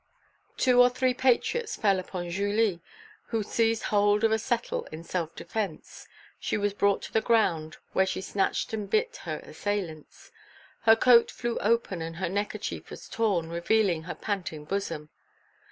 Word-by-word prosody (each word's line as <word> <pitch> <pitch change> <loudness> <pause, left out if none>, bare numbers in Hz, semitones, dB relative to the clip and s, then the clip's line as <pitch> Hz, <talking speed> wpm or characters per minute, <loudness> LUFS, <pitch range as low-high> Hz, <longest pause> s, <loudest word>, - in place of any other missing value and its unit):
Two 250 -2 +5
or 245 - +7
three 250 +1 +1
patriots 265 - +1
fell 195 -3 +2
upon 180 -1 -5
Julie, 200 -1 +1 0.5
who 225 -2 -1
seized 225 +1 +1
hold 205 +1 +3
of 225 - +4
a 220 - +2
settle 240 +1 -2
in 155 +1 -9
self 170 -1 -3
defence; 200 -8 -5 0.3
she - - -1
was 205 -1 0
brought 200 -1 +2
to - - -8
the 220 - +3
ground, 180 -9 +1 0.2
where 190 0 +3
she - - -2
scratched 195 +3 -1
and 210 -2 -3
bit 480 +3 +1
her - - -3
assailants. 185 -7 -5 0.5
Her 225 0 +8
coat 235 0 +6
flew 240 -1 -3
open 210 -5 +1
and 165 0 -5
her 180 0 -2
neckerchief 205 +3 -3
was - - -10
torn, 195 -8 0
revealing 170 +1 +1
her 180 - -5
panting 180 -7 -4
bosom. 165 -5 -3
205 Hz, 160 wpm, -28 LUFS, 175-225 Hz, 0.5 s, Her